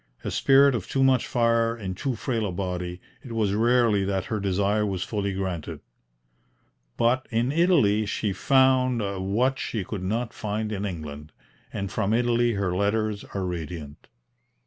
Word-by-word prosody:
A - - -3
spirit 140 0 +5
of 110 -7 -3
too 135 - +1
much 130 -2 +3
fire 115 -1 +2
in 95 -4 -4
too 125 +7 -3
frail 115 -2 -2
a - - -3
body, 90 -1 -4 0.2
it 120 - -9
was 105 -3 +1
rarely 115 -2 +3
that 95 -1 -1
her 110 - 0
desire 100 +2 +1
was 95 -3 -2
fully 100 -2 -2
granted. 95 -4 -4 1.2
But 125 +3 +2
in 120 +3 0
Italy 140 - +3
she 105 -1 -1
found 130 +2 +3 0.3
what 130 +5 +1
she 110 -4 -3
could 100 +1 -5
not 115 +5 -2
find 105 0 -3
in 100 -1 -3
England, 75 -4 -7 0.4
and 100 0 -4
from 110 -1 0
Italy 120 0 +2
her 100 -3 -1
letters 105 +1 0
are 95 -1 -1
radiant. 80 -4 -6
105 Hz, 160 wpm, -25 LUFS, 95-120 Hz, 1.2 s, spirit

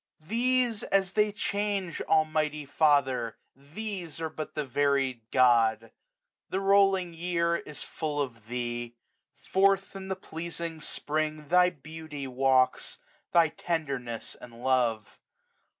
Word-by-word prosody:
These, 240 +1 +2
as 195 -1 +1
they 210 -1 +3
change, 200 -3 -2
Almighty 155 -1 +1
Father! 135 -6 +2 0.2
these. 170 +4 -6
Are 160 -1 -3
but 155 -1 -6
the 150 -1 -1
varied 135 -2 +1
God. 115 -3 +3 0.6
The 190 - -1
rolling 195 -2 +3
year 170 0 0
h 150 -1 -5
full 150 -2 -3
of 115 -6 -4
Thee. 120 0 -4 0.5
Forth 195 0 +2
i;i 190 0 -7
the 190 - -2
pleasing 165 -2 -5
Spring 155 0 -2
Thy 180 +1 +6
beauty 155 -2 -8
walks, 130 0 +2 0.3
thy 170 -2 +5
tenderness 140 -10 -3
and 120 0 -13
love. 120 -5 +1
155 Hz, 120 wpm, -29 LUFS, 130-180 Hz, 0.6 s, Thy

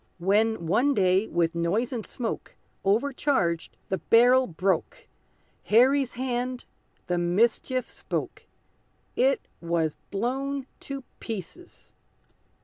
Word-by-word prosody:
When, 205 +1 +1
one 245 - +2
day, 190 +2 +3
with 170 -1 0
noise 190 +10 0
and 230 -3 -3
smoke, 235 +1 -5 0.3
Over 230 +9 +2
charged, 175 - 0
the 190 - -1
barrel 250 +3 +5
broke, 180 0 -1 0.6
Harry's 260 +4 +4
hand 250 0 -3 0.4
the 175 0 0
mischief 230 +8 +1
spoke - - -5 0.7
It 265 +2 +3 0.2
was 165 -2 0
blown 265 +6 -2
to 275 -1 -6 0.2
pieces! 225 - -8
225 Hz, 105 wpm, -26 LUFS, 180-255 Hz, 0.7 s, barrel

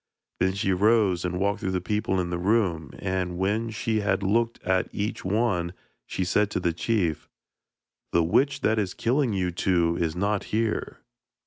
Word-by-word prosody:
Then 95 +1 +2
she 100 -1 0
rose 100 -2 +3
and 90 0 -2
walked 100 +1 0
through 95 - -2
the 95 -1 0
people 95 0 -1
in 90 -1 -2
the 85 - -2
room, 90 - +1
and 90 -2 -2
when 105 +5 0
she 110 0 -1
had 100 -2 0
looked 115 +4 +1
at 95 0 +1
each 105 +1 -3
one 95 -4 0 0.3
she 95 - -2
said 105 +3 +2
to - - -2
the 85 -2 0
chief: 85 -4 -1 0.8
'The 85 - +3
witch 140 - +2
that 110 0 +2
is 95 -4 -2
killing 130 +1 +1
you 95 -3 0
two 85 -1 +1
is 80 -2 -1
not 100 +2 0
here.' 110 - -2
95 Hz, 180 wpm, -26 LUFS, 90-110 Hz, 0.8 s, rose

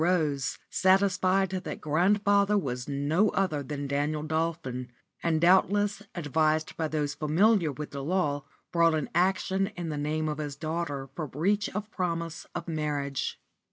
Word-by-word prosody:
Rose, 155 -6 +1
satisfied 190 0 +3
that 185 0 -4
grandfather 200 +5 +3
was 125 -8 -3
no 145 +8 +2
other 170 -7 0
than 145 +1 -4
Daniel 145 +2 -1
Dolphin, 155 -5 -2 0.3
and 165 -2 +1
doubtless 200 +4 +3
advised 155 -1 +1
by 160 - -1
those 150 -2 -1
familiar 160 +4 +3
with 150 +2 -7
the 140 -1 -5
law, 145 -4 0 0.3
brought 170 -1 +4
an 155 -3 -2
action 190 +2 +2
in 170 -2 -3
the 150 -1 -3
name 155 +2 -1
of 150 0 -3
his 145 -2 -4
daughter 155 -2 -3
for 155 -1 -4
breach 195 +10 0
of 210 +1 -4
promise 170 -3 -3
of - - -4
marriage. 145 -4 -2
160 Hz, 150 wpm, -28 LUFS, 145-185 Hz, 0.3 s, brought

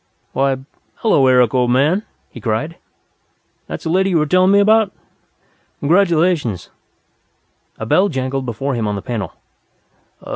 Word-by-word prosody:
"Why, 135 0 +1 0.4
hello, 145 - +2
Eric, 125 -3 +4
old 125 -1 +2
man!" 145 +10 +2 0.3
he - - -11
cried. - - -2 0.9
"That's - - -7
the 160 - -2
lady 190 +2 +2
you 175 - +2
were 155 - +2
telling 185 +4 +3
me 200 - +5
about? 215 0 +3 0.9
Congratulations!" 165 - +1 1.1
A 110 - -5
bell 190 - +3
jangled 135 -2 -3
before 135 +4 -3
him 115 -3 -2
on 105 - -2
the 100 - -6
panel. 105 -8 -4
140 Hz, 140 wpm, -18 LUFS, 125-185 Hz, 1.1 s, me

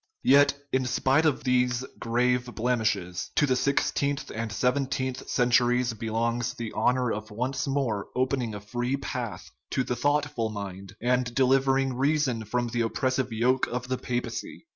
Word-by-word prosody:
Yet, 140 +1 +5 0.2
in 130 -1 +1
spite 135 +5 +3
of 150 - 0
those 125 0 +1
grave 125 +1 +1
blemishes, 110 -7 -1
to 150 - +4
the 130 -2 +2
sixteenth 140 +1 0
and 115 -1 -3
seventeenth 130 +2 -1
cen 125 -1 +1
turies 120 -1 +3
belongs 115 +2 -1
the 115 -2 -5
honor 125 +2 +2
of 110 +1 -4
once 125 +7 -2
more 130 -8 -1
opening 125 -3 0
a - - -5
free 120 +5 -2
path 125 -4 -5 0.2
to 130 - 0
the 125 - -2
thoughtful 145 -5 0
mind, 100 -2 -7
and 125 0 +1
delivering 135 0 +3
reason 135 -3 +1
from 120 +3 -1
the 120 0 -1
oppressive 130 +2 0
yoke 125 +4 +2
of 125 +1 -4
the 130 - 0
papacy. 120 - -4
125 Hz, 155 wpm, -27 LUFS, 115-130 Hz, 0.2 s, Yet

